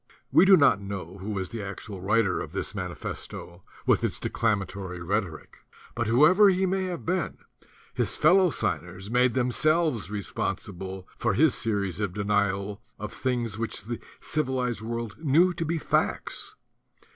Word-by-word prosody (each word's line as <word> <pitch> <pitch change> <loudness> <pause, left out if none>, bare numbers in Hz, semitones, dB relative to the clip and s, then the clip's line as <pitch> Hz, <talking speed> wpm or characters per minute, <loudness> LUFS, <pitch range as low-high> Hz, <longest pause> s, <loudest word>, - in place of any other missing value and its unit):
We 185 - +7
do 195 -1 +8
not 140 - +4
know 95 -2 -6
who 100 +3 -6
was 95 -3 -2
the 115 -2 -4
actual 100 0 -7
writer 105 +1 +2
of - - -7
this - - -3
manifesto 85 +1 -6 0.2
with - - +3
its - - -1
declamatory 100 -4 -2
rhetoric; 85 - -3 0.3
but 120 -1 -2
whoever 155 - +6
he 190 0 +2
may 190 0 0
have 180 -3 -5
been, 180 +1 -1 0.6
his - - -1
fellow 180 +3 +5
signers 95 - -3
made 125 0 +3
themselves 130 - +2
responsible 95 -2 -4
for 110 -4 +1
his 155 +3 +5
series 100 -4 -1
of 100 -4 -2
denials 100 -1 0 0.2
of 105 - -6
things 120 -6 -2
which 115 -3 -3
the 115 +2 -5 0.2
civilized 130 -7 -1
world 115 -1 -5
knew 165 +5 +4
to 165 -1 -3
be 165 +2 -1
facts. - - -1
115 Hz, 150 wpm, -27 LUFS, 100-150 Hz, 0.6 s, do